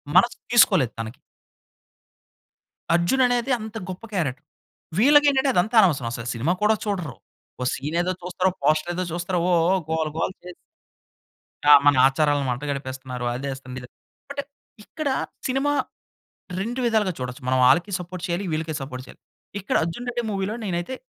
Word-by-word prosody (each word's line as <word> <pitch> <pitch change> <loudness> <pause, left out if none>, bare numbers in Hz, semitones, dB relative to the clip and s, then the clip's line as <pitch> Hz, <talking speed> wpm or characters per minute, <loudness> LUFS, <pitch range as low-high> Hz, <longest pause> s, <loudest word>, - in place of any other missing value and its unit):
మనసు 215 +7 +5
తీసుకోలేదు 190 - +5
తనకి. 115 +2 -6 1.7
'అర్జున్' 175 +11 +3
అనేది 245 +1 0
అంత 220 +1 -8
గొప్ప 185 +4 -8
క్యారెక్టర్. 150 -5 -2 0.5
వీళ్ళకేంటంటే. 280 +2 +5
అదంతా 210 +7 +1
అనవసరం 150 - +2
అసలు 115 0 -5
సినిమా 130 +9 0
కూడా 215 +1 +4
చూడరు. 180 - -3 0.4
ఓ - - -1
సీన్ 150 +5 -3
ఏదో 180 +1 -1
చూస్తారు. 185 +1 0
పోస్టర్ 155 +3 +2
ఏదో 185 +1 -2
చూస్తారు. 175 +1 -2
ఓహ్! 170 -2 +4
ఓహ్! 190 - +2
గోల 160 -1 0
గోల 165 - 0
చే 180 - -9 1.2
ఆ! - - +10
మన 145 -1 +6
ఆచారాలను 145 0 +1
మంట 125 +3 -3
గడిపేస్తున్నారు. 130 -2 -5
అది 130 +3 -5
ఏస్తున్నారు 130 -1 -8
ఇది 125 - -11 0.4
బట్ 280 0 -3 0.4
ఇక్కడ 310 +4 -4 0.4
సినిమా 270 +3 +1 0.9
2 235 +6 -3
విధాలుగా 215 -5 +2
చూడొచ్చు. 125 +1 -5
మనం 130 0 +2
ఆళ్ళకి 175 +9 +3
సపోర్ట్ 180 0 -8
చేయాలి, 175 +3 -2
వీళ్ళకి 160 0 -2
సపోర్ట్ 130 -1 -6
చేయాలి. - - -16 0.4
ఇక్కడ 200 - -2
అర్జున్ 170 +10 -5
రెడ్డి 240 0 -2
మూవీలో 195 +2 -2
నేనైతే 175 +6 -3
175 Hz, 150 wpm, -24 LUFS, 140-215 Hz, 1.7 s, ఆ